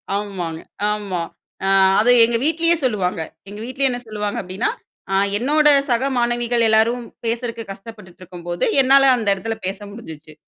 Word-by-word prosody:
ஆமாங்க. 185 Hz, -6 st, -4 dB, 0.3 s
ஆமா. 200 Hz, -4 st, -3 dB, 0.5 s
ஆ. -, -, +2 dB, 0.3 s
அது 245 Hz, +3 st, +4 dB
எங்க 230 Hz, 0 st, 0 dB
வீட்லயே 335 Hz, +2 st, +2 dB
சொல்லுவாங்க. 185 Hz, -7 st, -1 dB, 0.3 s
எங்க 205 Hz, -, -9 dB
வீட்லயே 265 Hz, +2 st, 0 dB
என்ன 245 Hz, -, -4 dB
சொல்லுவாங்க 210 Hz, -1 st, -4 dB
அப்டீன்னா, 185 Hz, +5 st, -2 dB, 0.4 s
ஆ -, -, +2 dB, 0.2 s
என்னோட 300 Hz, +6 st, +2 dB, 0.2 s
சக 245 Hz, +2 st, +1 dB
மாணவிகள் 240 Hz, -1 st, +1 dB
எல்லாரும் 225 Hz, +3 st, +2 dB, 0.2 s
பேசுறக்கு 230 Hz, 0 st, -3 dB
கஷ்டப்பட்டுட்ருக்கும் 185 Hz, -4 st, -12 dB
போது, 175 Hz, -, 0 dB, 0.2 s
என்னால 270 Hz, +1 st, +5 dB
அந்த 220 Hz, -3 st, -4 dB
எடத்துல 225 Hz, +3 st, -4 dB
பேச 195 Hz, +1 st, -4 dB
முடிஞ்சிச்சு. 160 Hz, -8 st, -11 dB
225 Hz, 145 wpm, -20 LUFS, 195-245 Hz, 0.5 s, என்னால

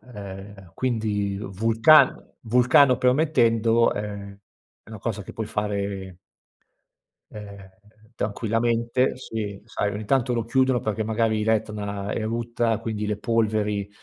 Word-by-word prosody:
ehm, 95 Hz, -2 st, -10 dB
quindi 105 Hz, -5 st, -1 dB
vulcano 115 Hz, +9 st, +4 dB, 0.2 s
vulcano 125 Hz, +3 st, +4 dB
permettendo 120 Hz, -4 st, +3 dB
è 100 Hz, -1 st, -6 dB, 0.5 s
è -, -, -20 dB
una 110 Hz, -, -7 dB
cosa 105 Hz, 0 st, -3 dB
che -, -, -10 dB
puoi 110 Hz, -, -4 dB
fare 100 Hz, -3 st, -3 dB, 1.1 s
ehm, 100 Hz, -2 st, -10 dB, 0.5 s
tranquillamente 115 Hz, +4 st, 0 dB
si 105 Hz, -5 st, -5 dB
sai 105 Hz, -2 st, -2 dB
ogni 105 Hz, +1 st, -5 dB
tanto 125 Hz, +1 st, +1 dB
lo 115 Hz, -1 st, -1 dB
chiudono 130 Hz, +1 st, +2 dB
perché 110 Hz, 0 st, -2 dB
magari 110 Hz, 0 st, 0 dB
l'Etna 105 Hz, -2 st, -2 dB
erutta, 115 Hz, 0 st, -1 dB
quindi 110 Hz, -2 st, -4 dB
le 105 Hz, -1 st, -1 dB
polveri 105 Hz, -3 st, 0 dB
110 Hz, 115 wpm, -24 LUFS, 100-115 Hz, 1.1 s, vulcano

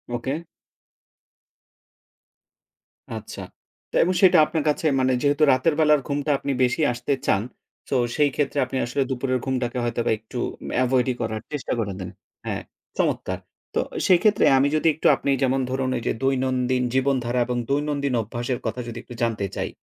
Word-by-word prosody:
ওকে। 130 Hz, +3 st, -2 dB, 2.8 s
আচ্ছা। -, -, -8 dB, 0.5 s
তো -, -, -7 dB
এবং 180 Hz, +3 st, +1 dB
সেটা 185 Hz, -2 st, +7 dB
আপনার 160 Hz, -1 st, -2 dB
কাছে 150 Hz, -, -1 dB
মানে 130 Hz, 0 st, +2 dB
যেহেতু 145 Hz, +1 st, +2 dB
রাতের 130 Hz, +5 st, +3 dB
বেলার 150 Hz, -2 st, +5 dB
ঘুমটা 145 Hz, +1 st, -1 dB
আপনি 140 Hz, -, -3 dB
বেশি 125 Hz, +5 st, +1 dB
আসতে 120 Hz, +3 st, -2 dB
চান, 100 Hz, -, +3 dB, 0.5 s
সো, 135 Hz, -, 0 dB, 0.2 s
সেইক্ষেত্রে 145 Hz, -1 st, +1 dB
আপনি 130 Hz, +1 st, -4 dB
আসলে 125 Hz, +4 st, -1 dB
দুপুরের 130 Hz, 0 st, -1 dB
ঘুমটাকে 130 Hz, -1 st, -1 dB
হয়তোবা 120 Hz, -1 st, 0 dB
একটু 115 Hz, +3 st, -9 dB, 0.4 s
অ্যা 130 Hz, -, +3 dB
avoid 125 Hz, 0 st, +2 dB
ই -, -, -1 dB
করার 110 Hz, -1 st, -2 dB
চেষ্টা 150 Hz, -2 st, -3 dB
করে 100 Hz, -4 st, -2 dB
দেন। 95 Hz, -, -5 dB, 0.4 s
হ্যাঁ, -, -, -3 dB, 0.4 s
চমৎকার! -, -, -1 dB, 0.4 s
তো, -, -, +2 dB, 0.3 s
সেইক্ষেত্রে 205 Hz, +3 st, +4 dB
আমি 135 Hz, +2 st, +4 dB
যদি 155 Hz, +1 st, +2 dB
একটু -, -, +1 dB
আপনি 140 Hz, -, -1 dB
যেমন 135 Hz, +1 st, +2 dB
ধরুন, 130 Hz, 0 st, -1 dB
ওইযে 120 Hz, -, -1 dB
দৈনন্দিন 130 Hz, -1 st, +1 dB
জীবনধারা 130 Hz, -2 st, +1 dB
এবং 125 Hz, 0 st, -2 dB
দৈনন্দিন 140 Hz, -1 st, 0 dB
অভ্যাসের 120 Hz, +3 st, -3 dB
কথা 120 Hz, +2 st, -2 dB
যদি 115 Hz, 0 st, -6 dB
একটু -, -, -11 dB
জানতে 110 Hz, -4 st, 0 dB
চাই। -, -, -2 dB
130 Hz, 155 wpm, -24 LUFS, 120-145 Hz, 2.8 s, সেটা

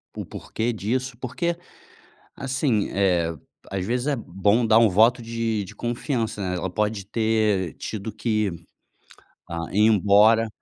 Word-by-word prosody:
o -, -, -5 dB
porquê 120 Hz, +2 st, -3 dB
disso? 120 Hz, +4 st, -2 dB
Porque, 135 Hz, +8 st, -2 dB, 0.8 s
assim, 130 Hz, -5 st, 0 dB
eh, 90 Hz, -4 st, +1 dB, 0.4 s
às 95 Hz, -1 st, -2 dB
vezes, 120 Hz, +4 st, -1 dB
é 145 Hz, -, +1 dB
bom 105 Hz, +3 st, +1 dB
dar 110 Hz, 0 st, +6 dB
um 115 Hz, -2 st, +5 dB
voto 115 Hz, +6 st, +4 dB
de 115 Hz, -2 st, -2 dB
de 100 Hz, +2 st, -10 dB
confiança, 120 Hz, -2 st, -2 dB
né? 90 Hz, -1 st, -2 dB
Ela 95 Hz, +2 st, -3 dB
pode 105 Hz, +1 st, -2 dB
ter 110 Hz, -5 st, +1 dB
tido 110 Hz, 0 st, -5 dB
que 110 Hz, -3 st, 0 dB, 1.0 s
a 85 Hz, -1 st, -3 dB
ir 105 Hz, +2 st, +4 dB
embora 110 Hz, +2 st, +5 dB
110 Hz, 140 wpm, -24 LUFS, 100-115 Hz, 1.0 s, dar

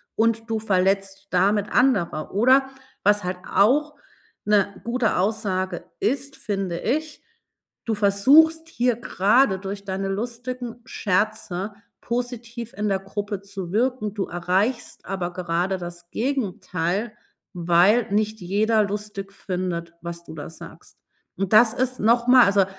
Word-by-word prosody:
und 225 Hz, 0 st, +1 dB
du 220 Hz, -1 st, 0 dB
verletzt 195 Hz, -1 st, 0 dB
damit 200 Hz, +3 st, +2 dB
andere.“ 200 Hz, -, +2 dB
Oder 260 Hz, +5 st, +4 dB, 0.3 s
was 205 Hz, -1 st, +3 dB
halt 180 Hz, 0 st, -3 dB, 0.2 s
auch 295 Hz, +8 st, +3 dB, 0.5 s
'ne 200 Hz, -1 st, +1 dB
gute 235 Hz, -3 st, +1 dB
Aussage 190 Hz, -2 st, -1 dB
ist, 275 Hz, +6 st, -1 dB
finde 195 Hz, -4 st, -3 dB
ich: 305 Hz, +5 st, -2 dB, 0.6 s
„Du 225 Hz, -2 st, 0 dB
versuchst 290 Hz, +12 st, +5 dB
hier 245 Hz, -5 st, +1 dB
grade, 210 Hz, 0 st, +3 dB
durch 200 Hz, +1 st, -6 dB
deine 195 Hz, 0 st, -3 dB
lustigen 240 Hz, +3 st, -5 dB
Scherze 205 Hz, -2 st, -1 dB, 0.3 s
positiv 235 Hz, -1 st, -4 dB
in 210 Hz, +1 st, -2 dB
der 195 Hz, -1 st, +1 dB
Gruppe 205 Hz, +1 st, -4 dB
zu 195 Hz, -3 st, -7 dB
wirken. 240 Hz, -2 st, 0 dB
Du 205 Hz, -2 st, -2 dB
erreichst 185 Hz, +8 st, -1 dB
aber 180 Hz, -2 st, -3 dB
gerade 180 Hz, +1 st, -1 dB
das 175 Hz, 0 st, -9 dB
Gegenteil, 210 Hz, -5 st, -2 dB, 0.4 s
weil 180 Hz, +6 st, +3 dB
nicht 215 Hz, 0 st, 0 dB
jeder 215 Hz, +4 st, +2 dB
lustig 200 Hz, -1 st, -5 dB
findet, 180 Hz, -3 st, -4 dB
was 170 Hz, 0 st, -6 dB
du -, -, -10 dB
da 145 Hz, -, -7 dB
sagst.“ 165 Hz, -, -13 dB, 0.4 s
Und 195 Hz, +1 st, -2 dB
das 220 Hz, +1 st, +7 dB
ist 255 Hz, 0 st, -1 dB
nochmal 240 Hz, +3 st, +5 dB
also, 200 Hz, -1 st, +4 dB
205 Hz, 130 wpm, -23 LUFS, 190-235 Hz, 0.6 s, das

